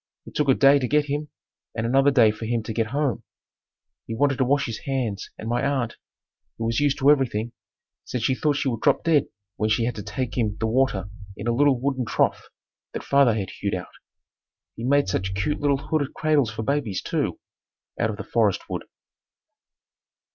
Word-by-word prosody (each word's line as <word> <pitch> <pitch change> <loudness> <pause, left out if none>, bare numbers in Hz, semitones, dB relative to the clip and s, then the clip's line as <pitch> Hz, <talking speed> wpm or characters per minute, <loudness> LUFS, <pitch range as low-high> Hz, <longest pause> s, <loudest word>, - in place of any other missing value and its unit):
It - - -12
took 150 -2 0
a 130 - +6
day 140 +1 +6
to 125 - -1
get 150 +3 +2
him 145 +1 -3 0.5
and 110 0 -2
another 135 +4 +4
day 120 -6 +5
for 110 +1 -7
him 115 -1 0
to 110 - -5
get 115 0 0
home. 140 -2 -1 0.9
He 115 - -4
wanted 140 +2 +1
to - - +4
wash 140 +2 +2
his 115 -3 -5
hands 125 -8 -3
and 110 - -7
my 120 +3 0
aunt, 135 -4 -1 0.6
who 115 - -3
was 115 +2 +1
used 145 -1 +2
to 140 +1 +5
everything, 120 -5 +1 0.5
said 125 -2 -4
she 130 - +2
thought 145 +2 +1
she 140 0 -1
would 115 -4 -2
drop - - +3
dead 160 -4 +3 0.3
when 110 - 0
she 110 +2 +2
had 120 - -1
to 105 - -6
take 125 +3 -4
him 105 -3 0
the - - 0
water 110 -5 +1 0.3
in 100 - -6
a 120 - +1
little 140 0 +3
wooden 130 -1 -1
trough - - 0 0.4
that - - -5
father 140 -5 +4
had 100 -3 -3
hewed 100 -1 -3
out. 90 - -7 0.8
He 115 - -7
made 140 +1 +3
such 95 0 -2
cute 125 +10 -1
little 145 -1 +2
hooded 145 0 -2
cradles 150 -6 +2
for 110 0 -5
babies, 130 -6 -1
too, - - -2 0.6
out 110 - +1
of 105 - -4
the 110 - -5
forest 110 -5 +1
wood. - - -4
125 Hz, 205 wpm, -24 LUFS, 110-140 Hz, 0.9 s, a